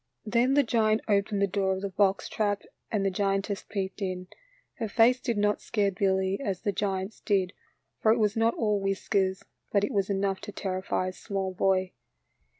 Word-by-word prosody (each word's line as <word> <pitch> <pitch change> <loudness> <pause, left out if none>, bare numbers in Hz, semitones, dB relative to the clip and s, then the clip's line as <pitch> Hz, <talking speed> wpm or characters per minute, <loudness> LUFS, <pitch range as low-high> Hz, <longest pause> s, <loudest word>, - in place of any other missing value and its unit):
Then 240 +5 +2
the 285 - +5
giant 220 -2 +2
opened 200 -1 +2
the - - +3
door 190 0 0
of 190 - -5
the 200 - -1
box 195 0 +1
trap 205 -2 -1 0.3
and 205 -3 0
the 195 - +2
giantess 195 +1 -1
peeped 195 0 -3
in. 185 -1 -3 0.5
Her 225 - -1
face 235 +4 +4
did 235 -3 -2
not 205 0 +1
scare 205 -3 0
Billy 190 0 +1
as 195 -7 -2
the 205 - 0
giant's 195 +1 -2
did, 195 -2 +1 0.5
for 220 - +4
it 230 - +4
was 210 -2 +2
not 225 +1 +2
all 210 -3 +1
whiskers, 195 -1 0 0.3
but 200 -1 +3
it 205 - -1
was 200 -1 +1
enough 195 -1 0
to 205 - -7
terrify 185 -1 -2
a - - -8
small 195 -2 -3
boy. 185 0 +1
200 Hz, 190 wpm, -28 LUFS, 190-210 Hz, 0.5 s, the